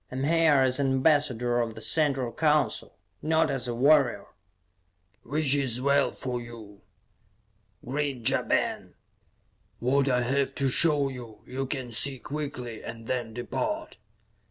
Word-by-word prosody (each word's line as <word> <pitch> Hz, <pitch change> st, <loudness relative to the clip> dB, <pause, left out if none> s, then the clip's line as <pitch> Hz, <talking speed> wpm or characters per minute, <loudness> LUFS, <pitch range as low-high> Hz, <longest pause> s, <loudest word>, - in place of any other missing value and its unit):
I -, -, -6 dB
am 130 Hz, -, -2 dB
here 165 Hz, 0 st, +4 dB
as 130 Hz, +1 st, +2 dB
an 140 Hz, -, +2 dB
ambassador 130 Hz, -4 st, +2 dB
of 115 Hz, -2 st, -2 dB
the -, -, -8 dB
Central 135 Hz, -6 st, +1 dB
Council, 150 Hz, 0 st, 0 dB, 0.2 s
not 160 Hz, 0 st, +2 dB
as 135 Hz, -2 st, -2 dB
a 120 Hz, -, -3 dB
warrior." 135 Hz, -5 st, +3 dB, 1.0 s
"Which 145 Hz, +2 st, +1 dB
is 135 Hz, -4 st, +1 dB
as 125 Hz, -, -4 dB
well 140 Hz, +1 st, +3 dB
for 125 Hz, -2 st, -5 dB
you," 110 Hz, -4 st, -11 dB, 1.0 s
grinned 135 Hz, -3 st, -2 dB
Ja -, -, +3 dB
Ben. -, -, -1 dB, 0.8 s
"What 135 Hz, +3 st, +1 dB
I 125 Hz, -1 st, +2 dB
have 135 Hz, +2 st, 0 dB
to 135 Hz, -1 st, +1 dB
show 145 Hz, 0 st, +3 dB
you, 120 Hz, -4 st, -10 dB
you 135 Hz, +1 st, -4 dB
can 130 Hz, -3 st, -4 dB
see 135 Hz, +4 st, 0 dB
quickly, 125 Hz, -4 st, -6 dB
and 115 Hz, -1 st, -8 dB
then 120 Hz, -3 st, -3 dB
depart." 310 Hz, -, -4 dB
130 Hz, 150 wpm, -27 LUFS, 120-145 Hz, 1.0 s, here